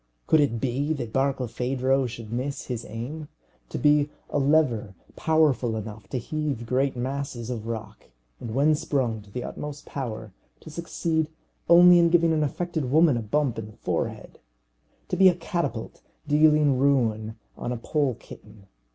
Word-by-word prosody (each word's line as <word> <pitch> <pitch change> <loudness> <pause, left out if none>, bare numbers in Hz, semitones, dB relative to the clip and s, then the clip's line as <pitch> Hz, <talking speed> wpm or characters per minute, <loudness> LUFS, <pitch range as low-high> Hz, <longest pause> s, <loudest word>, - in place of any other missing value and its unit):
could 160 - +4
it 135 -6 +1
be 135 +5 -1
that 120 -7 -5
Barkilphedro 130 0 0
should 115 -1 -8
miss 135 +4 -3
his 120 -3 -5
aim? 145 +7 -6 0.4
To - - -4
be 150 0 +3 0.2
a 145 - +1
lever 135 -9 +2 0.2
powerful 150 -8 +2
enough 105 -1 -7
to - - -2
heave 140 -1 -3
great 130 +2 0
masses 125 -2 -4
of 115 -2 -5
rock, 110 -2 -6 0.3
and 110 -1 -6
when 145 +3 +4
sprung 135 -8 -1
to 105 - -17
the 125 +4 -5
utmost 150 0 -7
power 110 -6 -6 0.3
to 160 - -11
succeed 160 -1 -1 0.4
only 175 +1 +8
in 170 0 +5
giving 165 -1 +4
an 155 - +1
affected 160 -2 -2
woman 155 0 +5
a 120 - -1
bump 120 +2 0
in 110 - -6
the 105 - -15
forehead - - -3 0.7
to - - 0
be 190 -1 +7
a 180 - +1
catapult 170 - -4 0.3
dealing 150 -2 +4
ruin 110 -6 +1 0.2
on 120 - -4
a 125 - -2
pole 140 +1 0
kitten! 100 -1 -14
135 Hz, 160 wpm, -26 LUFS, 115-150 Hz, 0.7 s, only